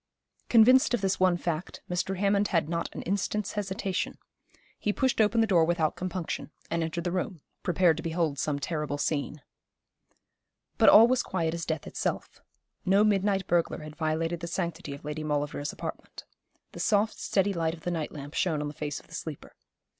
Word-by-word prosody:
Convinced 245 +2 +6
of 240 - -4
this 195 -1 0
one 185 -1 +4
fact, 170 0 -4
Mr. 180 +2 -1
Hammond 200 +1 +2
had 165 -4 +1
not 170 +1 -2
an - - -5
instant's 200 +2 -1
hesitation. 195 -2 -2 0.6
He 210 - 0
pushed 260 +1 +1
open 220 +2 +3
the - - +4
door 180 -6 +4
without 160 -2 +1
compunction, 180 -3 -4 0.2
and 170 - 0
entered 165 +1 -2
the 175 - -1
room, 180 -2 -3 0.2
prepared 175 -2 +3
to - - -4
behold 160 -4 -1
some 150 -2 0
terrible 150 -1 -2
scene. 145 0 -2 1.4
But - - +8
all 225 +2 +9
was 255 0 +2
quiet 165 -3 -1
as 170 0 -4
death 160 -2 -2
itself. - - -4 0.4
No 195 +3 +4
midnight 200 -2 +2
burglar 170 -2 0
had 155 0 -9
violated 165 +1 -1
the 170 - -5
sanctity 170 -4 -3
of 140 - -13
Lady 150 +1 -4
Maulevrier's 145 -1 -2
apartment. - - -7 0.5
The - - -10
soft, 215 0 +1
steady 200 0 +1
light 165 -2 -1
of 165 - -16
the 175 - -2
night 160 -3 -2
lamp 145 0 -8
shone 160 -5 +1
on 150 0 -2
the - - -8
face 150 -1 -4
of - - -20
the - - -17
sleeper. 160 -3 -7
170 Hz, 185 wpm, -28 LUFS, 155-195 Hz, 1.4 s, all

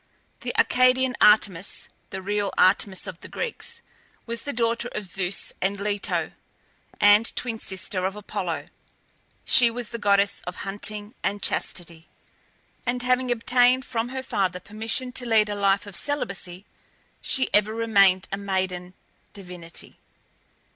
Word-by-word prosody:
The - - -5
Arcadian 255 0 +3
Artemis 205 -3 +3 0.2
(the 190 - -6
real 205 0 -1
Artemis 190 +1 +3
of 185 -3 -7
the - - -9
Greeks) 470 - -6 0.4
was 235 -1 -3
the 285 - -4
daughter 235 -1 0
of 210 - -3
Zeus 185 +1 -2
and 195 +1 0
Leto, 205 0 -1 0.7
and 205 +2 +5
twin 230 -3 -1
sister 190 -1 -3
of 195 - -6
Apollo. 200 -5 -4 0.8
She 245 -2 +7
was 235 -1 -4
the 235 - -6
goddess 200 -1 +2
of 180 - -4
Hunting 205 +2 -3
and 205 0 -2
Chastity, 170 -2 -2 0.8
and 245 +1 -1
having 255 0 +1
obtained 245 +2 +3
from 230 0 -2
her 260 0 -5
father 185 -7 -1
permission 225 +6 -2
to 250 0 0
lead 220 -2 +4
a 205 - -2
life 200 0 +2
of 205 -3 -9
celibacy, 195 -10 -2 0.6
she 260 - +2
ever 210 +1 +4
remained 200 -4 +3
a 195 - -2
maiden 185 -2 -3 0.4
divinity. 180 -4 -10
205 Hz, 140 wpm, -25 LUFS, 190-235 Hz, 0.8 s, She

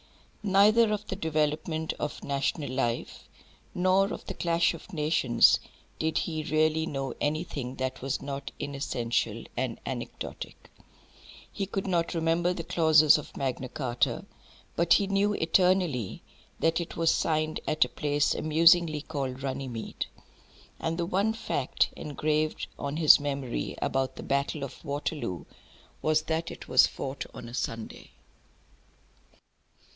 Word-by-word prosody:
Neither 210 +3 +5
of 210 0 -2
the - - -4
development 155 +1 -1
of - - -4
national 140 0 -1
life, 120 -3 -2 0.5
nor 185 +3 +3
of - - -6
the - - -5
clash 170 0 +2
of 165 - -11
nations, 150 -7 +4 0.4
did 160 0 0
he 160 -2 -1
really 155 +1 +2
know 135 -4 -3
anything 145 -4 -2
that 130 0 -3
was 135 +1 -2
not 140 0 -5
inessential 135 -4 -2
and - - -2
anecdotic. - - -6 0.8
He 195 - -3
could 195 0 -3
not 170 -3 0
remember 165 +2 +2
the 180 -2 -4
clauses 155 -3 +5
of 150 - -11
Magna 130 -1 -2
Charta, 125 -3 -1 0.5
but 170 0 +4
he 200 - +4
knew 200 +1 +2
eternally 170 - +1 0.4
that 165 +1 +2
it 170 - -7
was 165 -1 +3
signed 155 0 0
at 155 - +3
a - - -9
place 145 -1 +1
amusingly 160 0 +4
called 135 -4 -4
Runnymede. 130 -4 -4 0.7
And 165 0 -2
the 170 - 0
one 200 +5 +1
fact 145 - 0
engraved 155 +1 -1
on 140 +1 -3
his 155 -2 +8
memory 140 - -3
about 135 0 -1
the - - -8
battle 140 +1 -1
of 140 - -8
Waterloo 145 - -3 0.6
was 155 0 +2
that 160 +1 -2
it - - -9
was 130 - +6
fought 135 0 -5
on 120 - -8
a 120 - -10
Sunday. 115 -2 -5
155 Hz, 135 wpm, -28 LUFS, 135-170 Hz, 0.8 s, his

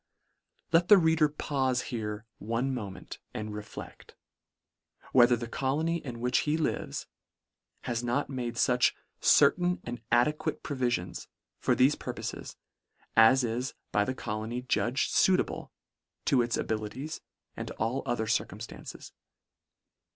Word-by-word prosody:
Let 170 +1 +4
the 205 - +9
reader 160 -3 +4
paufe 130 -4 0
here 110 -2 -4
one 115 +5 -1
moment, 105 -7 -6 0.2
and 110 0 -4
reflect 105 0 -9 0.5
— - - -28
whether 120 -1 +7
the 120 0 -5
colony 150 +8 0
in 120 -4 -6
which 125 +1 +2
he 150 +1 +1
lives, 160 - -2 0.8
has 120 0 -2
not 120 +4 0
made 125 -3 -4
fuch 125 +1 +3 0.2
" - - -50
certain 175 +5 +4
and 120 -1 -6
ade 120 +6 +4
" - - -32
quate - - -3
proviiions" 120 - -2 0.3
for - - +2
thefe 135 +3 +4
purpofes, - - -6 0.6
as 115 +4 +7
is 120 +3 -2 0.2
by 105 - +3
the 130 +5 -2
colony 110 +2 -4
judged 125 +1 0
fuitable 190 -1 +2 0.6
to 130 - +4
its 120 0 0
abili 110 -1 -2
ties, 150 +5 -6 0.3
and - - -5
all 115 +5 -2
other 120 -2 0
circumftances. - - -4
125 Hz, 135 wpm, -29 LUFS, 115-140 Hz, 0.8 s, the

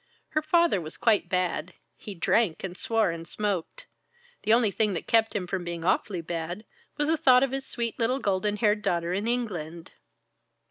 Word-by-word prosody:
Her 310 - 0
father 325 - +3
was 155 0 -8
quite 220 -3 +2
bad. 180 -1 -1 0.2
He 205 - -9
drank 175 +1 +1
and 185 -2 -5
swore 225 -2 +1
and 165 0 -7
smoked. 205 - -3 0.6
The 215 - 0
only 230 -2 +4
thing 210 0 +1
that - - -4
kept 225 -2 +2
him 195 -3 -1
from 185 0 -3
being 170 -1 -5
awfully 185 0 +1
bad, 170 +5 -5 0.3
was 295 -1 +1
the 320 +1 +2
thought 255 -3 +5
of 270 - 0
his 270 0 -4
sweet 235 0 -3
little 245 +3 +1
golden 205 -3 0
haired 210 -1 +2
daughter 170 -2 0
in 200 +4 -1
England." 175 -9 -3
210 Hz, 185 wpm, -27 LUFS, 175-235 Hz, 0.6 s, thought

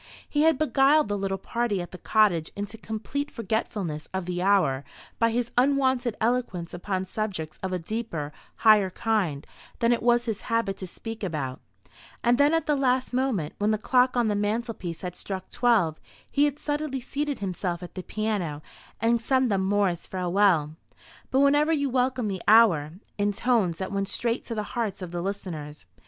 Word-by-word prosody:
He 295 - 0
had 320 -3 +4
beguiled 290 -2 +4
the 205 - 0
little 195 -1 -2
party 230 0 -1
at 175 - -6
the 180 - -9
cottage 195 -8 +2
into 205 +2 -5
complete 225 +6 -4
forgetfulness 215 -9 -3
of 190 -2 -2
the 180 0 -3
hour 180 -9 +3 0.4
by 230 - +4
his 235 +1 -1
unwonted 260 -3 +2
eloquence 220 -7 -1
upon 185 +1 -2
subjects 185 -7 -4
of 190 - -3
a 185 - 0
deeper, 170 -5 -4 0.2
higher 215 -4 +5
kind 185 -8 -1 0.3
than 235 0 +3
it 235 - -1
was 240 0 +3
his 220 -3 -3
habit 230 -4 0
to 190 - -6
speak 225 +4 -8
about; 145 -8 -3 0.6
and 240 +2 +3
then 285 +1 +5
at 325 0 +1
the 300 - +2
last 260 -2 +1
moment, 245 - 0
when 205 +1 +2
the 215 - +2
clock 250 +3 +2
on 240 -2 +3
the 210 - +1
mantelpiece 205 -4 -2
had 180 -1 -5
struck 190 -1 -6
twelve, 210 -11 +2 0.3
he 290 +1 +4
had 290 -1 -1
suddenly 295 -2 -2
seated 285 +3 -3
himself 180 -2 -3
at 175 - -9
the 185 - -5
piano, 190 -8 -2 0.4
and 230 +1 +2
sung 260 +1 +2
them 195 -2 +1
Moore's 195 -3 +1
"Farewell, 180 -4 +2 0.6
but 265 - +3
whenever 290 +3 +4
you 285 -4 +1
welcome 250 -2 +1
the 190 -3 -3
hour," 190 -9 +5 0.3
in 205 0 +2
tones 210 -6 +1
that 190 - -4
went 195 0 -1
straight 235 +4 -1
to 230 - -4
the 210 - -1
hearts 215 -6 -2
of 175 - -6
the 175 -1 -3
listeners. 170 -6 -5
215 Hz, 180 wpm, -26 LUFS, 185-245 Hz, 0.6 s, higher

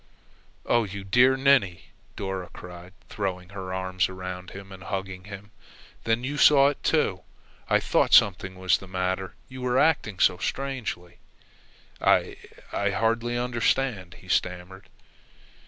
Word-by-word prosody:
"Oh, 120 -1 +3
you 100 -1 -7
dear 125 +7 +4
ninny!" 130 -11 +2 0.3
Dora 95 -2 -4
cried, 90 0 -11
throwing 90 -3 -4
her 95 -2 -7
arms 95 0 -1
around 90 -1 -7
him 100 0 -11
and 95 -1 -11
hugging 95 -1 -5
him. 100 +1 -10 0.5
"Then 115 +2 +1
you 140 +3 -3
saw 140 -2 +6
it, 145 - -6
too! - - +1 0.5
I - - +4
thought - - +1
something 95 -1 +4
was 95 0 +2
the 95 - -11
matter, 95 0 -3
you 130 0 -10
were 125 0 0
acting 145 - +2
so 90 - +3
strangely." 125 -9 -4 0.8
"I - - +3 0.4
I 100 - 0
hardly 115 +3 0
understand," 120 -5 -1
he 90 - -17
stammered. 90 +2 -2
95 Hz, 140 wpm, -26 LUFS, 95-120 Hz, 0.8 s, saw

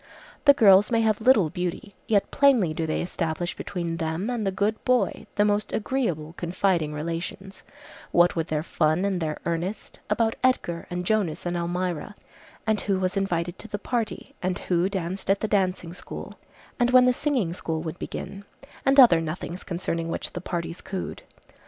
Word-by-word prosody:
The 285 -1 +8
girls 200 -5 +6
may 230 -1 +2
have 220 -1 +1
little 220 - +5
beauty, 180 +2 -4
yet 205 -3 +2
plainly 250 - +4
do 160 +1 -2
they 155 - -1
establish 175 0 -2
between 170 -3 -4
them 165 +7 -2
and 225 -4 -1
the - - +1
good 205 +3 -1
boy 255 -1 +1
the 205 - +3
most 210 0 0
agreeable, 195 - -1
confiding 175 -2 0
relations, 170 +5 -5 0.5
what 175 +1 +4
with 165 -1 -1
their 155 -1 -1
fun 160 +3 +1
and 190 -3 -1
their 155 -2 -2
earnest, 170 +5 -3
about 225 +1 +1
Edgar 175 -10 +1
and 180 0 -3
Jonas 190 -7 0
and 175 0 -1
Almira, 175 +2 -2 0.5
and 220 -2 +1
who 195 -2 0
was 185 0 -1
invited 175 -3 -1
to 220 - -8
the 205 - -4
party, 230 +1 -3
and 185 0 -1
who 180 0 0
danced 190 -1 -4
at 195 0 +3
the 220 - 0
dancing 185 -4 0
school, 180 - -7 0.5
and 245 0 +3
when 255 0 +7
the 250 - +4
singing 250 - 0
school 160 -2 -3
would 165 +1 -6
begin, 200 0 -6 0.4
and 275 +1 +4
other 200 -11 +8
nothings 165 +3 -5
concerning 170 -2 -3
which - - -4
the 175 - -5
parties 170 -1 -4
cooed. 190 -2 -5
185 Hz, 175 wpm, -25 LUFS, 170-210 Hz, 0.5 s, The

